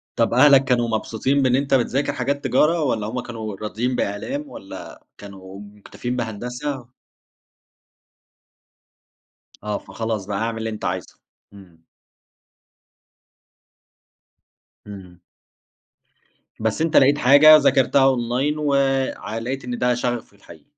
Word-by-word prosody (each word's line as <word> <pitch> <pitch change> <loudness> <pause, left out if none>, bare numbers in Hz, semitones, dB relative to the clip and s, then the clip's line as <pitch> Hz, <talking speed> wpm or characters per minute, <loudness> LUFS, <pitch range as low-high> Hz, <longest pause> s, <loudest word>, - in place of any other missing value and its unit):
طَب 115 0 +1
أهلَك 135 +2 +6
كانوا 120 -2 +1
مبسوطين 115 +5 -1
بإن 130 -2 +2
أنت 140 +1 -1
بتذاكر 135 +3 +1
حاجات 140 +2 -2
تجارة 165 +2 +2
والّا 110 -6 -1
هُم 125 +3 -4
كانوا 110 -4 -7
راضيين 110 +5 -3
بإعلام 265 - -4
والّا 95 - -11
كانوا 95 -1 -11
مُكتَفيين 105 +4 -7
بهندسة؟ 125 +3 -5 2.8
آه 105 -1 -2
فخلاص 110 -3 -5
بقى، 100 0 -4
اعمل 115 0 -2
اللي 110 0 -3
أنت 110 -1 -7
عايزه. 90 0 -5 0.3
امم. 85 -5 -17 3.0
امم. 95 -4 -12 1.4
بس 110 +6 -1
أنت 165 -1 +2
لقيت 140 +2 +5
حاجة 145 +3 +7
وذاكرتها 135 -2 +3
أونلاين 130 +3 +1
و 145 -2 0 0.4
ع 110 +1 -6
لقيت 130 +4 -4
إن 125 -1 -4
ده 125 0 +1
شغفك 120 -3 -3
الحقيقي. 85 -5 -17
120 Hz, 115 wpm, -21 LUFS, 105-135 Hz, 3.0 s, حاجة